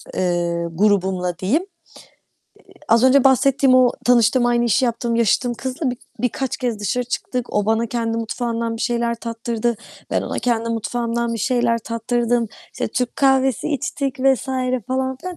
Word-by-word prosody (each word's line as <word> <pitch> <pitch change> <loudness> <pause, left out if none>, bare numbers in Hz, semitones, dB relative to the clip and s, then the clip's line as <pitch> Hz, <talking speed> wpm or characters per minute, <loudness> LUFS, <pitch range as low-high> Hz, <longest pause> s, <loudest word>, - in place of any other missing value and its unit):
eee, 175 -2 0
grubumla 185 -2 +1
diyeyim, 270 - +1 1.0
eee, - - -19
az 230 +2 +4
önce 260 +1 +5
bahsettiğim 270 0 +4
o 255 -1 +6
tanıştığım, 240 0 +4
aynı 240 0 +2
işi 235 +3 +2
yaptığım, 235 -1 -1
yaşıtım 235 +2 +2
kızla 260 +3 -3
bi 245 - -5 0.2
birkaç 250 +2 -1
kez 240 -4 -2
dışarı 210 +5 -1
çıktık. 245 0 -4
O 205 -1 +1
bana 225 +1 +1
kendi 230 -1 -2
mutfağımdan 230 0 -3
bir - - -8
şeyler 235 -1 0
tattırdı. 230 0 -3 0.3
Ben - - 0
ona - - -4
kendi 230 -2 0
mutfağımdan 235 +1 -2
bir - - -4
şeyler 240 0 +1
tattırdım. 235 +1 -1 0.2
İşte, - - -3
Türk 250 -2 -2
kahvesi 265 -3 +2
içtik 275 -2 -3
vs. 270 0 +2 0.4
falan 260 0 -1
filan, 360 +5 -7
235 Hz, 155 wpm, -20 LUFS, 225-255 Hz, 1.0 s, o